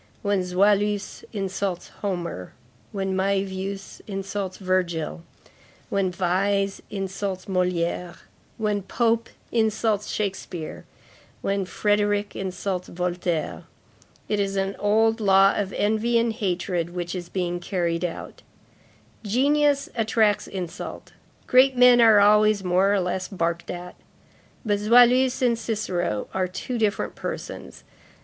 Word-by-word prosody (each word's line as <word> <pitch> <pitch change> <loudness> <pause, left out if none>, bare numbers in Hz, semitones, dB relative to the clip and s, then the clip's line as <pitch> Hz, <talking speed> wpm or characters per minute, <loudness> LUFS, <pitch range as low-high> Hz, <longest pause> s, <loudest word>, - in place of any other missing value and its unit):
When 200 -1 +1
Zoïlus 200 +2 +1
insults 195 -3 -3
Homer, 175 - -4 0.4
when 195 -1 -2
Mævius 195 0 -2
insults 195 -1 -4
Virgil, 180 -4 -1 0.7
when 195 -2 +1
Visé 195 +2 0
insults 195 -1 -4
Molière, 180 -2 -1 0.4
when 210 -2 0
Pope 230 +3 0 0.2
insults 220 -2 +1
Shakspeare, 190 -5 -4 0.6
when 195 -1 0
Frederic 205 +1 0
insults 185 -1 -3
Voltaire, 175 -2 -2 0.6
it 210 - 0
is 195 -1 -1
an 195 0 -1
old 220 +2 +3
law 195 -1 +5
of 195 -2 -2
envy 220 +3 +1
and 230 -1 +1
hatred 180 -5 -2
which 175 -1 -3
is 175 -2 -6
being 175 -2 -2
carried 175 -2 -1
out; 175 -2 -5 0.8
genius 280 +5 +2
attracts 220 -2 +2
insult, 180 -3 -6 0.3
great 255 +1 +5
men 250 -1 +7
are 220 -2 +7
always 210 0 +5
more 185 +2 +3
or 205 - +3
less 185 0 -2
barked 170 -3 -2
at. 180 0 -6 0.7
But 205 -2 +1
Zoïlus 245 +4 +5
and 235 -2 +2
Cicero 185 - -2
are 185 -1 0
two 235 +6 -4
different 210 -2 0
persons. - - -7
195 Hz, 115 wpm, -24 LUFS, 180-215 Hz, 0.8 s, men